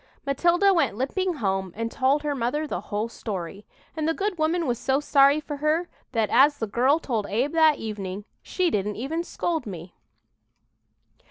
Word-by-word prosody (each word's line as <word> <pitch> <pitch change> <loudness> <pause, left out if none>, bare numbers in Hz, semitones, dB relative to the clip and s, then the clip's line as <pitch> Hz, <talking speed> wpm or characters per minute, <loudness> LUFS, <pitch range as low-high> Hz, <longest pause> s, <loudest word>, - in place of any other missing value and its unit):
Matilda 350 +8 +3
went 295 - +1
limping 355 - -1
home 190 - -2
and 230 +1 -3
told 275 +3 +1
her 295 -1 -1
mother 275 +4 -1
the 185 - -4
whole 210 +2 -1
story, 200 -3 -6 0.3
and 310 -1 -1
the 325 - +1
good 400 -3 -2
woman 325 +2 +1
was 240 -3 -1
so 270 +1 +1
sorry 280 0 +4
for 295 -1 -6
her 310 +4 0 0.2
that, 225 -2 0
as 285 +4 +5
the 225 - -2
girl 250 +8 +2
told 230 -10 -2
Abe 245 +8 0
that 315 -2 +5
evening, 205 -2 -5 0.2
"she 365 -2 -1
didn't 210 0 -1
even 310 +8 -3
scold 335 -5 -3
me." 175 -2 -8
275 Hz, 175 wpm, -25 LUFS, 215-315 Hz, 0.3 s, as